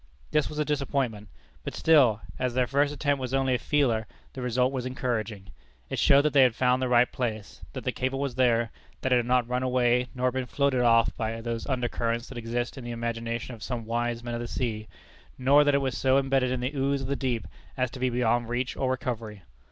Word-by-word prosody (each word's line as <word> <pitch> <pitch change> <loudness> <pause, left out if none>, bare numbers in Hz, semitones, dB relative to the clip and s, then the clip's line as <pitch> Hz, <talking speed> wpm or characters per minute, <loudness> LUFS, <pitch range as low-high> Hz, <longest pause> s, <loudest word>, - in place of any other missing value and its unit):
This 150 -1 +2
was 150 - -8
a 150 - +1
disappointment, 135 -7 -2 0.3
but - - -5
still, 130 -9 +4 0.2
as 125 -1 -1
their 130 -1 +3
first 140 +3 +1
attempt 145 -1 0
was 130 +1 -2
only 135 -1 +2
a 125 - +1
"feeler," 120 -7 +1 0.3
the 130 - -6
result 125 +1 +1
was 130 -2 -3
encouraging. 115 -6 -3 0.4
It - - -2
showed 140 0 +5
that 150 - +1
they 140 - +6
had 125 -3 +4
found 125 0 +2
the 130 - 0
right 120 0 +4
place; 110 -5 -4
that - - -6
the - - 0
cable 130 +1 -2
was 140 -2 -2
there; 120 -3 +2 0.3
that 130 - +1
it - - +5
had 120 -1 0
not 125 -1 +2
run 125 +1 -1
away 125 -1 +2
nor 125 0 +1
been 130 0 -3
floated 140 -2 +1
off 115 -1 +4
by 115 0 -2
those 115 0 -4
under 125 -3 0
currents 115 0 -2
that - - -8
exist 120 +3 -3
in - - -9
the 120 - -6
imagination 115 +1 -3
of 115 - -11
some 120 -2 -4
wise 120 +1 -2
men 120 0 -4
of 120 - -3
the 120 - -4
sea; 110 -4 -3 0.5
nor 140 +3 +5
that 145 -1 +3
it 140 - +2
was 130 -3 -1
so 130 +1 +3
imbedded 135 -1 +2
in 125 -1 -2
the 130 +4 -2
ooze 140 0 0
of 130 - -4
the 140 - -1
deep 125 -4 -2 0.3
as 125 -1 0
to 130 - -9
be 130 0 +1
beyond 120 -1 +1
reach 125 +2 -2
or 130 - -1
recovery. 115 - -4
125 Hz, 235 wpm, -27 LUFS, 115-135 Hz, 0.5 s, they